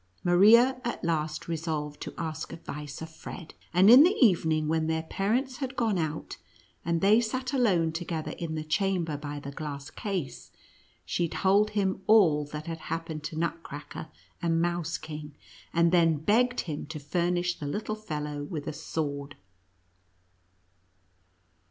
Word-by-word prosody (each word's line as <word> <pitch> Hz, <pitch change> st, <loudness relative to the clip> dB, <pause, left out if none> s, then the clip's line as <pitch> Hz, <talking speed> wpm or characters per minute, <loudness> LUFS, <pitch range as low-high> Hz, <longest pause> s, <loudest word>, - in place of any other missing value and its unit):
Maria 230 Hz, +9 st, +6 dB
at 235 Hz, -7 st, -3 dB
last 155 Hz, -2 st, -1 dB
resolved 155 Hz, -3 st, -3 dB
to -, -, -5 dB
ask 160 Hz, 0 st, -4 dB
advice 150 Hz, -2 st, -7 dB
of 160 Hz, -, -7 dB
Fred; 165 Hz, +1 st, -9 dB, 0.2 s
and 180 Hz, +3 st, +5 dB
in 245 Hz, +5 st, +10 dB
the 360 Hz, +6 st, +5 dB
evening, 160 Hz, -, +3 dB
when 160 Hz, 0 st, +1 dB
their 160 Hz, 0 st, 0 dB
parents 240 Hz, -, -1 dB
had 265 Hz, +1 st, -4 dB
gone 220 Hz, -7 st, +1 dB
out, 155 Hz, -1 st, -3 dB, 0.5 s
and 170 Hz, -1 st, 0 dB
they 210 Hz, +4 st, +5 dB
sat 255 Hz, +3 st, -3 dB
alone 190 Hz, -11 st, +3 dB
together 165 Hz, -1 st, -4 dB
in 165 Hz, -2 st, -3 dB
the 155 Hz, -, -3 dB
chamber 170 Hz, -1 st, 0 dB
by 145 Hz, 0 st, -5 dB
the 140 Hz, 0 st, -7 dB
glass 140 Hz, -1 st, -6 dB
case, 190 Hz, -9 st, -4 dB, 0.6 s
she 170 Hz, -2 st, -1 dB
told 200 Hz, +5 st, +3 dB
him 190 Hz, -1 st, +1 dB
all 180 Hz, -9 st, +5 dB
that 150 Hz, +1 st, -7 dB
had 165 Hz, -1 st, -5 dB
happened 165 Hz, -2 st, -4 dB
to 155 Hz, +2 st, -5 dB
Nutcracker 165 Hz, -2 st, -4 dB, 0.3 s
and 165 Hz, -1 st, +1 dB
Mouse 170 Hz, -1 st, -1 dB
Kino:, 150 Hz, -1 st, -8 dB, 0.4 s
and 170 Hz, 0 st, +3 dB
then 165 Hz, -3 st, +4 dB
becwd 245 Hz, -, +2 dB
him 150 Hz, -3 st, -5 dB
to 155 Hz, -, -6 dB
furnish 175 Hz, +4 st, -1 dB
the 145 Hz, -, -4 dB
little 210 Hz, +8 st, -3 dB
fellow 150 Hz, -8 st, -4 dB
with 150 Hz, -2 st, -5 dB
a -, -, -3 dB
sword. 145 Hz, -2 st, -4 dB
165 Hz, 150 wpm, -28 LUFS, 155-195 Hz, 0.6 s, in